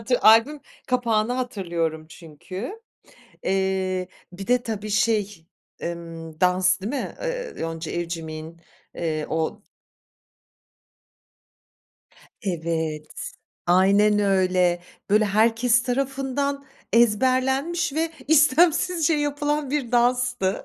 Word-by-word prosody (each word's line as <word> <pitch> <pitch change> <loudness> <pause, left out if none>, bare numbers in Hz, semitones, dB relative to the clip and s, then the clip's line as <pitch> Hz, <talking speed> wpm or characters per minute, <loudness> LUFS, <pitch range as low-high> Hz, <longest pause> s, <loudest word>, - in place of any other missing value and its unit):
Adı 245 +2 +1
albüm 230 +7 +6 0.3
kapağını 235 -2 +1
hatırlıyorum 170 -10 -3
çünkü. 185 - -8 0.6
Eee, 190 -1 0 0.2
bir 190 +2 -8
de 245 0 +2
tabii 215 -2 -4
şey, 210 -5 0 0.3
emm, 165 -2 -7
dans 185 +1 +3
değil 200 +4 -4
mi? 280 - -3
Iıı, - - -4
Yonca 165 0 -4
Evcimik'in, 165 -1 -5 0.3
eee, 155 -2 -2
o 160 +6 -2 2.8
Evet, 160 -4 -3 0.4
aynen 200 +4 +4
öyle. 185 -3 +2 0.3
Böyle, 215 +1 +5
herkes 225 +3 +3
tarafından 275 +2 -2 0.3
ezberlenmiş 260 +8 +2
ve 320 +2 0 0.2
istemsizce 320 +2 +4
yapılan 290 -1 -1
bir 270 -4 -2
danstı. 245 -4 +1
210 Hz, 90 wpm, -24 LUFS, 175-260 Hz, 2.8 s, albüm